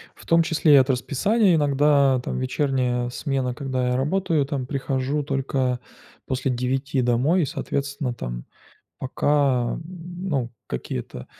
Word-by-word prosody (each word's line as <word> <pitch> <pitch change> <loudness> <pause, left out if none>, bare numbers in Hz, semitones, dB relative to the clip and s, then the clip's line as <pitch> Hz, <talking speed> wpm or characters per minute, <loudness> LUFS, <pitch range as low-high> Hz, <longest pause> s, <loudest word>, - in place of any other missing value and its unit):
В - - -16
том 165 0 +5
числе 160 -2 +3
и - - +10
от 135 0 +5
расписания: 180 - +2
иногда 140 -3 +3
там - - -3
вечерняя 130 -2 0
смена, 130 -1 -2
когда 130 -3 -2
я 125 - +1
работаю, 155 +1 +1
там 135 -4 -3
прихожу 135 +1 -1
только 135 -2 -1 0.5
после 130 0 -1
9 130 +2 -1
домой 130 +9 +2
и, - - +1
соответственно, 140 -3 -3
там - - -6 0.5
пока, 135 -2 +1
м, - - -5 0.5
ну, 130 -6 -1 0.2
какие-то 60 0 -5
135 Hz, 135 wpm, -24 LUFS, 125-145 Hz, 0.5 s, и